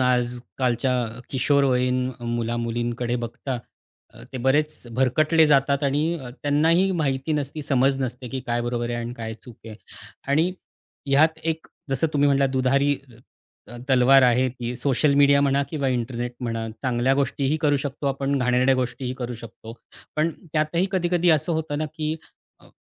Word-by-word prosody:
आजकालच्या 125 0 0 0.4
किशोरवयीन 130 -2 +2
मुला-मुलींकडे 120 +1 -2
बघता 125 +2 -5 0.6
अ, - - -13
ते 130 - -4
बरेच 150 0 +1
भरकटले 155 +5 +3
जातात 140 0 +3
आणि 155 +5 0 0.2
त्यांनाही 165 +6 +3
माहिती 135 +1 -1
नसती 150 +1 -3
समज 135 -1 +2
नसते 125 0 -5
की 135 - -4
काय 120 0 0
बरोबर 120 0 -2
आहे 120 - -2
आणि 120 +1 -4
काय 110 -2 -6
चूक 120 -1 -14
आहे. 110 - -8 0.5
आणि 160 +6 +2 0.5
ह्यात 155 +4 +3
एक 160 0 -2 0.2
जसं 135 +4 +1
तुम्ही 145 0 +3
म्हटलात 140 -1 +3
दुधारी 140 +2 +2 0.7
अ, 120 - -10
तलवार 130 +1 +6
आहे 125 +1 +4
ती 120 -1 -5
सोशल 140 +3 +2
मीडिया 140 0 +5
म्हणा 140 0 +2
किंवा 140 -4 -1
इंटरनेट 120 -1 -2
म्हणा 115 -2 -3 0.2
चांगल्या 125 +1 +1
गोष्टीही 140 +2 0
करू 145 -1 +3
शकतो 140 +1 -4
आपण, 135 +1 0
घाणेरड्या 125 +1 +3
गोष्टीही 125 0 -2
करू 125 -2 -5
शकतो. 115 0 -11 0.4
पण 160 +2 +2 0.2
त्यातही 160 +4 +1
कधी-कधी 175 -1 +2
असं 160 +2 +2
होतं 160 -2 -2
ना, 155 - -1
की 155 -1 -2 0.5
अ, - - -19
135 Hz, 150 wpm, -24 LUFS, 125-145 Hz, 0.7 s, तलवार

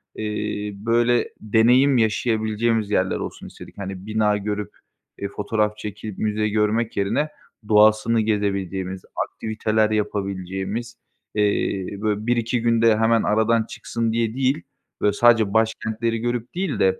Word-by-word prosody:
eee, 105 -1 -3
böyle, 120 +3 +1
deneyim 125 +5 +4
yaşayabileceğimiz 110 -1 +1
yerler 95 -2 +1
olsun - - -6
istedik. - - -13
Hani, 95 -1 -6
bina 105 -1 +1
görüp, 105 0 -4 0.5
eee, 100 - -3
fotoğraf 105 +1 -1
çekip 105 -1 -7
müze 105 0 0
görmek 110 +2 0
yerine 100 +10 0 0.4
doğasını 110 +2 +4
gezebileceğimiz, 95 -3 -2 0.3
aktiviteler 110 0 0
yapabileceğimiz, 100 +2 -3 0.4
eee, 100 -2 0
böyle, 105 0 -1
1-2 120 0 +1
günde 115 -1 +3
hemen 115 0 +3
aradan 110 +2 +2
çıksın 115 0 -3
diye 115 -1 0
değil, 135 +3 0 0.4
böyle, 105 - +3
sadece 115 -2 +4
başkentleri 110 +1 0
görüp 120 +4 -3
değil 185 -5 -2
de, 95 0 +2
110 Hz, 125 wpm, -22 LUFS, 105-115 Hz, 0.5 s, deneyim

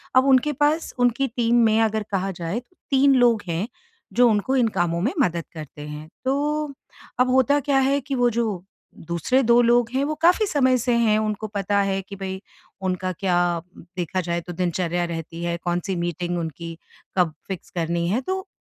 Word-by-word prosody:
अब 255 - +6
उनके 270 +2 +4
पास 295 +4 +1
उनकी 245 +2 +2
टीम 235 0 0
में 220 0 +3
अगर 220 -1 +1
कहा 195 0 -1
जाए 175 +5 -3
तो 250 +9 -22 0.2
3 275 0 +5
लोग 240 -3 +4
हैं 170 +5 -2 0.5
जो 245 0 +5
उनको 220 +5 +1
इन 250 -3 +3
कामों 170 -1 +1
में 235 +9 +1
मदद 170 -7 +1
करते 150 -2 -9
हैं। 150 +1 -8 0.2
तो 295 +2 0 0.5
अब 250 0 +4
होता 265 +3 +4
क्या 275 0 +2
है 275 +1 +2
कि 270 +1 -3
वो 245 -1 +3
जो 220 -6 -2 0.4
दूसरे 170 +10 +1
2 235 +1 +5
लोग 240 0 +3
हैं 270 +1 +1
वो 305 - -1
काफ़ी 360 +6 +5
समय 260 -7 +3
से 240 +1 0
हैं, 220 -2 +3
उनको 215 0 -2
पता 200 -1 0
है 195 -1 0
कि 200 +1 -10
भई 190 -1 -5 0.4
उनका 185 0 -1
क्या 175 -2 +1 0.4
देखा 185 +1 -1
जाए 170 0 -2
तो 175 +1 -8
दिनचर्या 175 0 -1
रहती 165 0 -6
है, 170 0 -1
कौन-सी 175 +2 -1
मीटिंग 175 0 -2
उनकी 165 0 -6 0.4
कब 175 -4 +3
फिक्स 190 0 -6
करनी 170 -1 -1
है 235 +7 +1
तो, 380 +6 -3
210 Hz, 190 wpm, -23 LUFS, 175-255 Hz, 0.5 s, अब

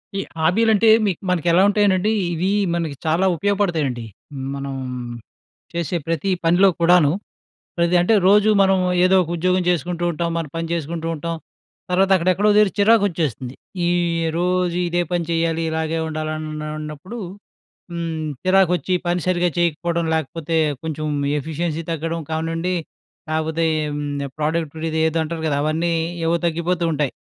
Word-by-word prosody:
ఈ - - -1 0.2
హాబీలు 215 +8 +3
అంటే, 220 +2 +4 0.2
మీ 200 - +2 0.2
మనకు 175 -2 0
ఎలా 175 +2 +5
ఉంటాయనండి, 205 -1 +2 0.2
ఇవి 180 +4 0 0.2
మనకి 165 -4 -2
చాలా 165 +4 +2
ఉపయోగపడతాయండి. 165 - 0 0.5
మనం, 140 0 -5 1.0
చేసే 170 0 -1
ప్రతి 165 +3 -1 0.2
పనిలో 175 +4 +5
కూడాను. 170 -3 +5 0.7
ప్రతి 170 0 +2
అంటే 180 +6 +3
రోజు 210 +1 +5
మనం 190 0 +3 0.3
ఏదో 185 +1 +4
ఒక 170 - -6
ఉద్యోగం 185 +2 +1
చేసుకుంటూ 175 +1 -1
ఉంటాం, 170 +1 -2
మనం 165 -2 -3
పని 165 0 -2
చేసుకుంటూ 165 0 -3
ఉంటాం. 165 +2 -4 0.6
తర్వాత 190 +2 +2
అక్కడ 180 0 -1
ఎక్కడో 205 +4 +2
దగ్గర 210 -2 +5
చిరాకు 215 +1 +5
వచ్చేస్తుంది. 140 - -3 0.3
ఈ - - +2 0.5
రోజు 180 0 +1
ఇదే 175 +1 +1
పని 175 -1 0
చేయాలి, 165 0 0
ఇలాగే 160 0 -1
ఉండాలి. 155 0 -3
అన్ 155 - -5 0.3
అన్నప్పుడు 155 +9 -7 0.7
హ్మ్, 165 -2 -3 0.2
చిరాకు 185 -1 +4
వచ్చి 180 +3 -2
పని 175 +1 +1
సరిగ్గా 180 -1 +2
చేయకపోవడం, 170 0 0
లేకపోతే 160 +1 -2 0.3
కొంచెం 155 -1 -4 0.3
ఎఫిషియన్సీ 160 +2 -3
తగ్గడం 165 +1 -2
కావనండి, 165 +3 -1 0.5
లేకపోతే 160 +1 -1 0.3
హ్మ్, 150 0 -3 0.3
ప్రొడక్టివిటీ 160 +2 0
ఇపుడు 160 +2 -6
ఇదేదో 160 0 +1
అంటారు 160 +1 -4
కదా! 145 -2 +1
అవన్నీ 160 +3 0 0.3
ఏవో 170 +1 +2
తగ్గిపోతూ 170 +1 -1
ఉంటాయి. 145 -3 -1
170 Hz, 145 wpm, -21 LUFS, 160-180 Hz, 1.0 s, ఎలా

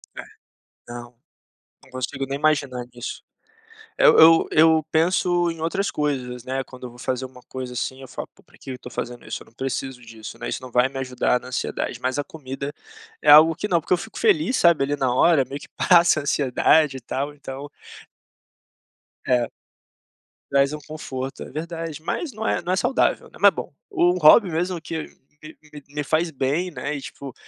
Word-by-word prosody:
É. - - -6 0.7
Não. 120 0 -9 0.7
Não - - -20
consigo, 130 +2 -4
nem, 140 +1 -3
imaginar 140 -5 0
nisso. 120 +1 -6 0.8
Eu - - +7
eu 165 +1 +7
eu 160 0 +5
penso 175 +1 +2
em 165 - -9
outras 165 +5 -1
coisas, 125 -5 -3
né. 135 +1 -3
Quando 130 -1 -11
eu - - -6
vou 120 - -16
fazer 130 +1 -2
uma 130 -1 -13
coisa, 130 -1 -6
assim, 130 +2 -3
eu 130 - -10
falo: - - -7
"Pô, - - -23
pra - - -23
que, - - -20
que 135 - -5
eu 125 - -6
tô - - -10
fazendo, 120 0 -6
isso?", - - -5
eu - - -13
não - - -22
preciso 130 0 -4
disso, 115 -2 -10
né. - - -5
Isso, - - -4
não 130 -1 -10
vai 125 +2 +4
me 135 - -9
ajudar 125 -1 0
na 125 - -12
ansiedade. 125 -1 -3
Mas, 130 +3 -1
a 145 - 0
comida 140 -2 -7 0.5
é 145 - +6
algo 160 +2 +8
que 210 - -3
não. 170 -4 +2
Porque, 180 - 0
eu - - +3
fico - - -8
feliz 315 - +3
sabe, 170 -5 +4
ali, 145 +1 0
na 130 -3 0
hora, 145 +2 +4
meio 140 +1 -7
que, - - -13
passa 170 -3 +4
a 145 - -5
ansiedade 140 +1 +2
e 130 - -10
tal. 140 +5 -3
Então 140 0 -8 1.6
É. 125 -2 +2 1.0
Traz 140 +1 +3
um 150 - -5
conforto, 135 -4 -6
é - - -11
verdade. 165 0 -5
Mas, 270 - -3
não 220 0 -4
é - - 0
não 175 +1 -3
é - - +3
saudável, 265 - +1
né. - - -16
Ma - - +7
bom, - - -7 0.2
o 180 - +3
hobby 175 +5 +7
mesmo, 175 +2 -2
que 160 -1 -5 0.4
me 150 -2 -13
me 145 +1 -3
faz 160 +4 0
bem, 150 +6 -1
né. 150 0 -4
E 140 - -5
tipo, 135 -1 -9
145 Hz, 205 wpm, -23 LUFS, 130-165 Hz, 1.6 s, algo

